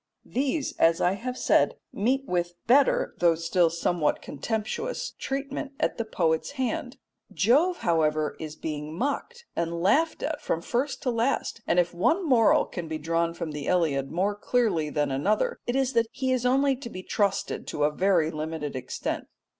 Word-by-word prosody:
These, 275 +3 -1
as 165 0 +4
I 180 - +3
have 250 +6 -4
said, - - +3 0.2
meet 260 +6 +1
with 175 -1 -1
better, 270 +3 +4
though 170 -2 +4
still 165 +1 +2
somewhat 170 -1 0
contemptuous, 235 - -3
treatment 275 +1 -4
at - - 0
the 230 - -1
poet's 165 - 0
hand. 255 -1 -3 0.3
Jove, 300 - +3
however, 155 -2 +1
is 155 -1 -6
being 155 0 -5
mocked 475 - -3
and 170 0 -1
laughed 305 - +2
at 310 0 -2
from 165 - -2
first 260 +4 -2
to 250 - +1
last, 230 0 -1
and 170 - +2
if 175 -1 +2
one 330 - +1
moral 240 -5 +5
can 175 -2 -6
be 160 0 -3
drawn 165 +2 0
from 165 -2 -4
the 150 -1 -5
Iliad 150 -7 +1
more 190 +5 +1
clearly 205 -7 0
than 145 -2 0
another, 185 +11 0
it 245 - 0
is 270 -1 +1
that 230 -1 +3
he 260 -1 -1
is 250 -1 +1
only 270 +2 +3
to 250 -2 -7
be 185 -4 -8
trusted 200 -1 -1
to 145 - -2
a 150 - +3
very 175 -2 +2
limited 155 -2 -4
extent. 130 - -4
195 Hz, 175 wpm, -27 LUFS, 165-260 Hz, 0.3 s, moral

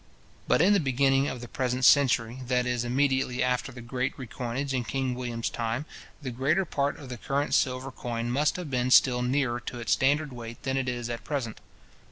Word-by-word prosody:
But - - +4
in 200 +3 +5
the 200 - +4
beginning 135 -1 +2
of 125 -4 -4
the 120 - -7
present 130 -2 -1
century, 125 -3 +4
that 125 -1 +1
is, 125 -1 0
immediately 130 0 +1
after 125 -1 0
the 120 - -10
great 125 +2 -2
recoinage 130 +2 -4
in 125 -2 0
King 130 +3 -2
William's 120 -2 -3
time, 115 +5 -2 0.4
the 130 - -3
greater 145 +10 +1
part 140 -3 -1
of 140 - -10
the 125 - -5
current 140 +4 -1
silver 130 0 +1
coin 120 -1 -4
must 145 +4 +2
have 175 -6 -5
been 125 -1 +1
still 125 -1 +5
nearer 125 -1 0
to 120 +1 -7
its 120 - -3
standard 145 +1 +2
weight 115 -1 -9
than 130 0 -1
it 130 -2 0
is 120 -1 -3
at 120 -2 -5
present. 125 -5 -3
130 Hz, 205 wpm, -28 LUFS, 120-140 Hz, 0.4 s, in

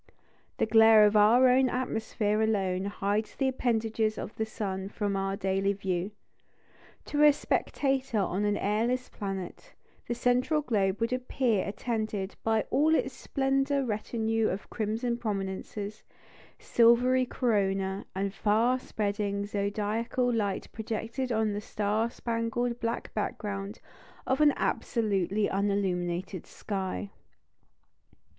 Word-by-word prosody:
The - - +2
glare 220 -1 +7
of 210 +1 +2
our 225 +5 +6
own 255 +1 +4
atmosphere 220 -4 -1
alone 195 -4 0
hides 205 +1 -2
the 270 - 0
appendages 225 -3 0
of - - -6
the 220 - -2
sun 195 -3 -4
from 205 -1 -2
our 195 0 -1
daily 195 +1 0
view. 190 -1 -2 1.0
To 295 - -1
a 300 0 +8
spectator 270 -3 -1
on 195 0 0
an 205 0 +1
airless 235 +5 0
planet, 195 -3 -6 0.3
the 240 - -1
central 250 +5 +2
globe 200 -6 0
would 230 +2 +1
appear 250 -5 0
attended 215 -2 -3
by 220 -1 +2
all 315 +3 +4
its - - 0
splendid 270 0 0
retinue 225 0 0
of 190 - -5
crimson 230 +2 -2
prominences, 200 0 -4 0.5
silvery 250 +2 +4
corona, 195 -6 0
and 195 0 -2
far 225 +5 +2
spreading 205 -3 -2
zodiacal 210 +4 -1
light 205 -4 -1
projected 230 +3 -4
on 220 -2 +1
the 205 - -3
star 215 +2 -1
spangled 235 +1 -2
black 230 0 -3
background 205 -1 -4 0.5
of 265 +3 +1
an 300 -1 +7
absolutely 205 -3 0
unilluminated 185 -2 -1
sky. 195 0 -4
215 Hz, 120 wpm, -29 LUFS, 200-240 Hz, 1.0 s, a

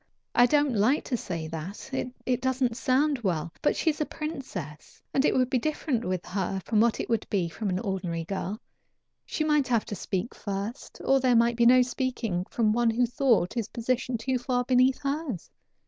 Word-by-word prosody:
I 245 - +6
don't 290 -1 +3
like 225 +7 +3
to 255 - -2
say 170 -8 -4
that 170 +10 -7 0.3
it 255 -1 0
doesn't 260 -2 +1
sound 270 +3 +2
well 170 -6 -2
but - - +2
she 320 - +2
is 305 - -7
a - - +2
princess, 250 - -7
and 270 - +3
it - - +3
would 255 -1 +3
be 255 0 +1
different 285 -3 -1
with 185 -1 -2
her 190 0 -2
from 220 - +2
what 235 -1 +2
it - - -2
would 230 -2 0
be 180 -5 -1
with 210 - 0
an 180 - 0
ordinary 185 -5 -2
girl; 195 +3 -4 0.7
she 310 - -1
might 300 -3 +2
have 235 -3 +1
to 205 - -5
speak 190 +3 -3
first, 205 +5 -5
or 270 0 +4
there 255 -2 +3
might 235 +1 +4
be 235 0 +4
no 250 +1 +7
speaking 245 -8 -2
from 220 -3 +2
one 240 0 +3
who 240 +2 +2
thought 235 - +2
his 230 -3 -2
position 245 +1 -1
too 255 +2 -1
far 245 0 0
beneath 255 +1 +3
hers. 275 - -3
235 Hz, 200 wpm, -27 LUFS, 195-260 Hz, 0.7 s, no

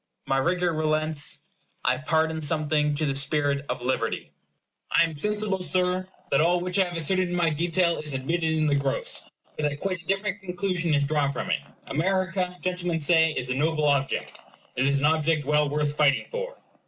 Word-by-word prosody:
My 135 - +1
rigor 175 +4 +1
relents. 155 -1 0 0.4
I 125 0 +3
pardon 160 +1 0
something 150 -1 +1
to 155 +1 -1
the 140 -2 -1
spirit 140 0 +1
of - - -3
liberty. 130 +1 -2 0.6
I - - +5
am 165 -2 -2
sensible, 210 +4 -1
Sir, 180 0 +1 0.2
that 140 - +4
all 175 +2 +3
which 180 +2 -1
I 190 - +5
have 175 -1 -5
asserted 185 +3 +2
in 175 - -2
my 170 -2 +2
detail 170 +2 +1
is 150 -3 -3
admitted 160 +5 -1
in 155 -1 +1
the 145 - +2
gross; 140 -1 0 0.3
but 150 -1 0
that 145 0 -6
quite 185 -2 -2
a - - -22
different 200 0 -1
conclusion 180 -3 -1
is 145 - +2
drawn 140 -1 +1
from 140 - -4
it. - - +1 0.3
America, 180 +3 -1
gentlemen 180 -2 -1
say, 160 +1 +5
is 125 -3 -3
a - - +2
noble 155 +3 0
object. 140 -2 0 0.4
It 130 +2 +1
is 140 0 +2
an 140 - +1
object 155 -1 +2
well 150 0 +2
worth 150 0 -1
fighting 140 -3 +3
for. - - -5
160 Hz, 190 wpm, -26 LUFS, 145-180 Hz, 0.6 s, I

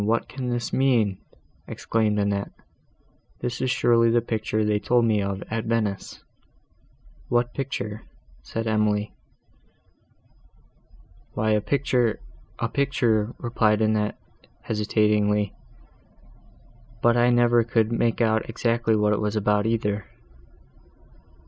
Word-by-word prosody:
what 115 +1 +1
can 130 -2 -5
this 120 -1 -3
mean?" 120 -7 +2 0.5
exclaimed 110 -2 -1
Annette. 100 -1 -1 0.9
"This 120 0 -4
is 130 - 0
surely 115 -1 +3
the 120 +1 +3
picture 110 -2 -2
they 105 0 +1
told 120 +2 +2
me 110 -2 +2
of 100 0 -3
at 115 0 -2
Venice." 110 -4 -2 1.1
"What 120 0 +1
picture?" 110 -6 -4 0.4
said 115 0 -5
Emily. 105 -1 0 2.2
"Why 110 +1 0
a 105 -1 +2
picture—a 120 -2 -2
picture," 120 -6 0
replied 110 -3 +1
Annette, 110 -1 0 0.5
hesitatingly—"but 105 -1 +1 1.6
I 120 0 +4
never 120 -1 +4
could 115 -1 +1
make 115 0 0
out 110 -1 +1
exactly 115 0 0
what 105 0 +2
it 105 - -1
was 105 0 -1
about, 105 0 +1
either." 105 -3 -1
110 Hz, 110 wpm, -24 LUFS, 105-120 Hz, 2.2 s, I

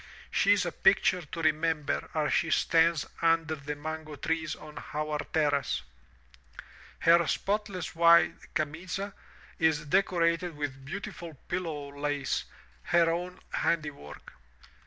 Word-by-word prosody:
She - - +4
is - - +1
a - - -2
picture 180 -1 +3
to 165 +2 -6
remember 155 -1 0
as 150 -1 +1
she 165 - +2
stands 165 0 +3 0.2
under 165 -1 +2
the 150 -1 -5
mango 155 0 -6
trees 160 +3 -2
on 150 0 -10
our 150 0 -1
terrace. 145 - +1 1.2
Her 170 0 +5
spotless 200 -3 -2
white 170 0 +6 0.2
'*camiza'' 175 +6 -3 0.5
is 160 -2 +2
decorated 170 -1 +1
with 135 -2 -4
beautiful 170 0 -7
pillow 155 -6 -3
lace, 145 -1 -1 0.4
her 170 -1 +4
own 180 +2 -4
handiwork. 150 - -3
160 Hz, 115 wpm, -29 LUFS, 150-170 Hz, 1.2 s, white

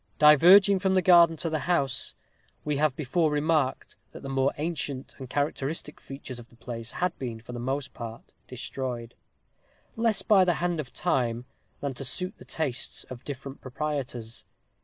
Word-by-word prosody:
Diverging 185 +7 +7
from 190 0 +1
the 185 - +3
garden 170 -2 +7
to 165 - -1
the 155 - 0
house, 135 -7 0 0.5
we 150 -1 0
have 150 -2 +2
before 155 +3 +1
remarked 150 -2 0 0.2
that - - -10
the 135 - -5
more 135 0 +2
ancient 145 -4 -4
and 130 -2 -8
characteristic 145 +2 -2
features 135 -2 -8
of 120 - -13
the - - -20
place 115 0 -7
had 180 -1 -1
been, 120 -4 -4
for 115 +2 -11
the 120 - -5
most 135 +2 -3
part, 115 -1 -9
destroyed; 125 -2 -5 0.8
less 225 -2 +2
by 200 -3 +6
the 175 -2 +2
hand 175 -2 -1
of 130 -4 -5
time 125 -8 0 0.4
than 140 -1 -2
to 135 - -6
suit 185 - -2
the - - -12
tastes 135 -6 -3
of 125 -1 -8
different 140 -1 -7
proprietors. 130 -4 -4
140 Hz, 170 wpm, -27 LUFS, 125-165 Hz, 0.8 s, Diverging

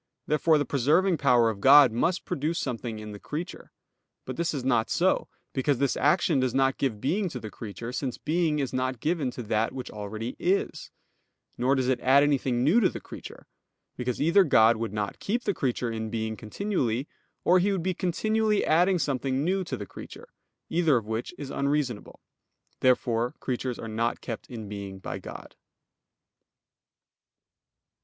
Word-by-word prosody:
Therefore 155 +1 +3
the 145 - 0
preserving 160 +7 +2
power 120 -4 +4
of 100 -2 -9
God 135 0 +8
must 170 +11 0
produce 155 +4 -2
something 120 -3 -3
in 105 0 -8
the 105 - -9
creature. 160 - -6 0.5
But 130 - -5
this 170 +3 -1
is 140 -4 -4
not 120 -4 +1
so; - - +1 0.3
because 135 +1 +1
this 140 +1 +1
action 150 0 +2
does 130 -1 0
not 135 0 +2
give 120 -7 -1
being 185 - 0
to 130 - -6
the 110 -2 -8
creature, 115 +2 -7
since 130 -2 -3
being 160 0 0
is 135 -4 -2
not 130 -1 -1
given 155 -1 0
to 125 0 -7
that 110 +1 0
which 130 -1 -6
already 110 +3 -5
is: 190 +3 -1 0.7
nor 130 +3 +2
does 130 -2 0
it 130 -1 +1
add 135 +2 +5
anything 130 -4 +1
new 165 - +5
to 205 - +3
the - - -7
creature; - - -11 0.5
because 125 -1 -3
either 170 +6 +5
God 115 -7 +5
would 115 -2 -3
not 105 -1 -3
keep 235 +4 -1
the 205 - 0
creature 125 -5 -1
in 110 -1 -4
being 110 -1 -3
continually, 125 - -2 0.4
or 180 +1 +5
He 200 +3 +2
would 190 -4 -1
be 185 +1 0
continually 215 +4 +1
adding 180 +4 +3
something 135 -3 -1
new 190 +3 +1
to - - -4
the - - -6
creature; 470 - -11 0.4
either 160 -5 +3
of 115 - -3
which 110 +2 -3
is 140 -2 -7
unreasonable. 140 -6 -2 0.6
Therefore 120 -1 +1
creatures 125 -1 -3
are 115 - -7
not 115 +2 -1
kept 115 -3 -6
in 110 -4 -7
being 100 -1 -6
by 95 - -6
God. - - -10
130 Hz, 175 wpm, -27 LUFS, 115-160 Hz, 0.7 s, God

